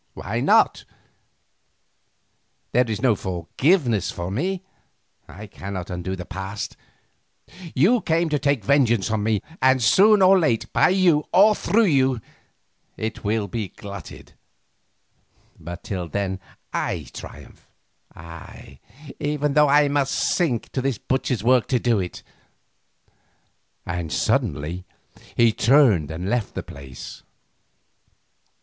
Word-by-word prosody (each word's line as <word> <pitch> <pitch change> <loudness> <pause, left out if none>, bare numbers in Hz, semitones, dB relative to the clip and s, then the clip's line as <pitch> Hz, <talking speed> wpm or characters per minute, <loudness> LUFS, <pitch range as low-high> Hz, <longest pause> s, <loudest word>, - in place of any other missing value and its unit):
Why - - -4
not? - - +3 1.9
There 125 -1 +2
is 110 +2 -3
no 125 -4 +5
forgiveness 105 - 0
for 85 +1 -5
me, 180 - -2 0.6
I 105 +2 -10
cannot 95 -2 -7
undo 90 +1 -4
the 90 -1 -8
past. 95 +3 -6 1.0
You 210 - +4
came 165 +1 +1
to 150 -1 0
take 140 -6 0
vengeance 120 -6 +2
on 110 -1 0
me, 105 -1 0 0.2
and 130 0 +4
soon 195 - +5
or 190 +1 +6
late 115 -8 0
by - - +4
you, 180 -5 +3
or 210 +3 +6
through 225 +3 +2
you, 135 - +2 0.8
it 110 0 -5
will 105 0 0
be 105 +1 -4
glutted, 100 -3 -11 1.3
but 85 +2 -8
till 90 -3 -4
then 95 +1 -2 0.3
I - - -2
triumph, - - -12 0.5
ay, 85 0 -12 0.4
even 145 -1 -1
when 150 +1 +5
I 145 +1 +5
must 140 -1 0
sink 145 -11 0
to 130 - -2
this 135 -3 -1
butcher's 130 -3 -2
work 125 0 +3
to 130 - +1
do 115 -4 +1
it," 90 -2 -5 1.6
and 85 -2 -4
suddenly 75 +8 -1 0.5
he 115 -2 +4
turned 115 - +4
and 85 +4 -5
left 115 -1 -1
the - - -4
place. 65 -2 -10
115 Hz, 125 wpm, -23 LUFS, 95-145 Hz, 1.9 s, or